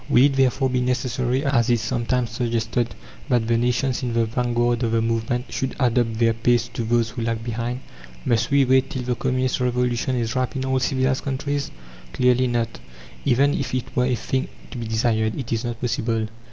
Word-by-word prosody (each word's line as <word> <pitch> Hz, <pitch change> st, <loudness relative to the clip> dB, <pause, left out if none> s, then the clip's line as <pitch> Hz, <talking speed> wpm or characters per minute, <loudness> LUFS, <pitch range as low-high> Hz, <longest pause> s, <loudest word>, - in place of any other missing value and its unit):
Will 125 Hz, -, +6 dB
it 145 Hz, -, +3 dB
therefore 130 Hz, 0 st, +2 dB
be 125 Hz, 0 st, +1 dB
necessary, 125 Hz, +1 st, 0 dB
as 130 Hz, -5 st, +2 dB
is 120 Hz, -1 st, +3 dB
sometimes 120 Hz, 0 st, -1 dB
suggested, 115 Hz, 0 st, -1 dB, 0.3 s
that 120 Hz, -3 st, +2 dB
the 115 Hz, -, +3 dB
nations 125 Hz, +2 st, +1 dB
in 125 Hz, -2 st, -2 dB
the 115 Hz, 0 st, +2 dB
vanguard 120 Hz, +1 st, 0 dB
of 115 Hz, -2 st, 0 dB
the 115 Hz, -, +3 dB
movement 115 Hz, +2 st, -1 dB
should 130 Hz, -, -2 dB
adapt 120 Hz, -3 st, +2 dB
their 115 Hz, 0 st, +3 dB
pace 115 Hz, +1 st, +2 dB
to 120 Hz, -, -4 dB
those 115 Hz, 0 st, +1 dB
who 120 Hz, +1 st, -5 dB
lag 115 Hz, 0 st, -2 dB
behind? 120 Hz, +2 st, -3 dB, 0.4 s
Must 115 Hz, 0 st, +2 dB
we 140 Hz, -1 st, +4 dB
wait 130 Hz, +1 st, +3 dB
till 130 Hz, -, -4 dB
the 125 Hz, 0 st, 0 dB
Communist 130 Hz, +1 st, 0 dB
Revolution 125 Hz, 0 st, 0 dB
is 120 Hz, +1 st, -1 dB
ripe 130 Hz, +2 st, -1 dB
in 130 Hz, 0 st, -2 dB
all 130 Hz, 0 st, +1 dB
civilized 130 Hz, +1 st, 0 dB
countries? 140 Hz, +1 st, -2 dB, 0.4 s
Clearly 125 Hz, 0 st, +3 dB
not! 115 Hz, -2 st, -1 dB, 0.5 s
Even 140 Hz, +2 st, +3 dB
if 130 Hz, -2 st, -2 dB
it 125 Hz, -, -4 dB
were 125 Hz, -, +3 dB
a 125 Hz, -, +1 dB
thing 130 Hz, +3 st, -2 dB, 0.2 s
to 125 Hz, -, -6 dB
be 115 Hz, -, -4 dB
desired, 110 Hz, -1 st, +1 dB
it 125 Hz, -3 st, -3 dB
is 115 Hz, +1 st, -1 dB
not 120 Hz, -1 st, -4 dB
possible. 115 Hz, -2 st, -1 dB
120 Hz, 200 wpm, -23 LUFS, 115-130 Hz, 0.5 s, Will